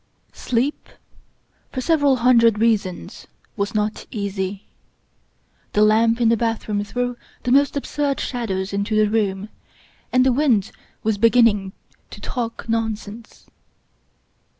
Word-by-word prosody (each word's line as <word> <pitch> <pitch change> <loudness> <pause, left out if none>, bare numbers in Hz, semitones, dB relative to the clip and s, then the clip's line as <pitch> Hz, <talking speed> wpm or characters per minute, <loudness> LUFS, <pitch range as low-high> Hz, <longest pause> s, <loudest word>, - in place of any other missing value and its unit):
Sleep, 255 +5 -2 0.8
for 260 - -4
several 285 -1 +3
hundred 235 -3 +4
reasons, 210 -5 -1 0.3
was 200 0 -3
not 210 0 -2
easy. 200 -2 -4 1.1
The 210 - +4
lamp 225 +2 +3
in 235 -2 +3
the 230 - +4
bath 225 0 -2
room 205 -1 -1
threw 245 +3 -3 0.3
the 245 - -1
most 280 +2 +3
absurd 280 0 -2
shadows 200 -6 -3
into 200 +2 -1
the 215 0 +4
room, 205 -2 -1 0.6
and 255 0 +4
the 260 - +4
wind 245 -8 +2 0.3
was 215 -2 0
beginning 225 -4 +3 0.4
to - - -11
talk 235 -3 -5
non 225 -1 0
sense. 220 +2 -13
225 Hz, 125 wpm, -21 LUFS, 205-245 Hz, 1.1 s, hundred